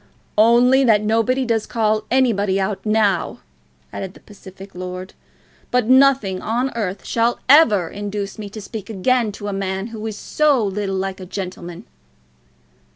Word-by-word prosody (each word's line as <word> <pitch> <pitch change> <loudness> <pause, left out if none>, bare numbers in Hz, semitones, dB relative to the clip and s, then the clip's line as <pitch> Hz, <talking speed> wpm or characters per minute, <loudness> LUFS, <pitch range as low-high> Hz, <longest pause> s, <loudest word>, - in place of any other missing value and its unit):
"Only 245 +4 +5
that 215 -3 +4
nobody 230 +5 +1
does 225 -2 -1
call 215 -2 0
any 255 -2 +3
body 200 -1 0
out 190 0 -2
now," 215 -2 +1 0.5
added 190 -1 -6
the - - -14
pacific 195 -1 -14
lord. 185 +1 -7 0.6
"But 250 -2 +1
nothing 260 -8 +4
on 245 +4 -1
earth 200 -4 -4
shall 235 +1 0
ever 240 - +5
induce 205 +2 -5
me 205 -1 -6
to 215 +2 -9
speak 205 0 -8
again 225 +2 +1
to 205 - -7
a 205 - -3
man 195 +1 -3
who 215 -1 -7
is 215 -2 -6
so 290 -5 +1
little 195 0 -2
like 190 0 -3
a 185 - -8
gentleman." 180 -2 -7
210 Hz, 160 wpm, -20 LUFS, 195-235 Hz, 0.6 s, Only